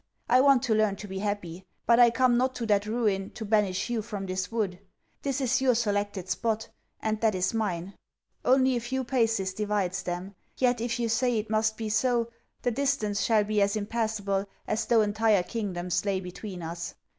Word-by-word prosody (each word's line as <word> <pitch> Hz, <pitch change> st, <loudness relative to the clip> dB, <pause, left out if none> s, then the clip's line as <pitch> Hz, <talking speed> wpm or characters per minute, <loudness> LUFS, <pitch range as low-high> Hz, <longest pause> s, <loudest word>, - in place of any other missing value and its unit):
I 255 Hz, +2 st, +5 dB
want 275 Hz, -2 st, +5 dB
to 240 Hz, -5 st, +2 dB
learn 215 Hz, -2 st, +2 dB
to 205 Hz, -, -9 dB
be 190 Hz, 0 st, -5 dB
happy. 190 Hz, -4 st, -3 dB, 0.2 s
But 235 Hz, 0 st, +5 dB
I 240 Hz, -1 st, +8 dB
come 245 Hz, +1 st, +3 dB
not 255 Hz, +2 st, +1 dB
to 235 Hz, -, -3 dB
that 205 Hz, -1 st, +2 dB
Ruin, 210 Hz, -4 st, 0 dB
to 220 Hz, -, -5 dB
banish 200 Hz, -3 st, +1 dB
you 240 Hz, -2 st, -1 dB
from 205 Hz, -2 st, -5 dB
this 185 Hz, 0 st, -3 dB
wood. 205 Hz, -6 st, -1 dB, 0.4 s
This 275 Hz, -1 st, -1 dB
is 265 Hz, -1 st, +1 dB
your 255 Hz, -2 st, +4 dB
selected 205 Hz, -4 st, -1 dB
spot; 220 Hz, +4 st, -1 dB, 0.3 s
and 215 Hz, -1 st, -1 dB
that 220 Hz, -3 st, +3 dB
is 185 Hz, +4 st, 0 dB
mine. 195 Hz, -4 st, -2 dB, 0.5 s
Only 260 Hz, 0 st, +4 dB
a -, -, +1 dB
few 260 Hz, +3 st, -2 dB
paces 225 Hz, -7 st, +1 dB
divides 200 Hz, -2 st, -1 dB
them. 180 Hz, +2 st, -5 dB, 0.2 s
Yet, 245 Hz, -2 st, +2 dB
if 235 Hz, 0 st, -1 dB
you 235 Hz, -, +1 dB
say 240 Hz, +1 st, +1 dB
it 215 Hz, 0 st, -3 dB
must 220 Hz, 0 st, +1 dB
be 225 Hz, -, -3 dB
so, 235 Hz, +2 st, +1 dB, 0.3 s
the 245 Hz, -, +1 dB
distance 250 Hz, -6 st, 0 dB
shall 220 Hz, -2 st, +3 dB
be 210 Hz, 0 st, 0 dB
as 200 Hz, +1 st, +2 dB
impassable 205 Hz, -2 st, -1 dB, 0.2 s
as 215 Hz, -, -1 dB
though 230 Hz, -2 st, +5 dB
entire 210 Hz, -2 st, +2 dB
kingdoms 180 Hz, -5 st, -2 dB
lay 200 Hz, -2 st, 0 dB
between 180 Hz, 0 st, -7 dB
us. 170 Hz, +1 st, -5 dB
215 Hz, 195 wpm, -28 LUFS, 195-235 Hz, 0.5 s, I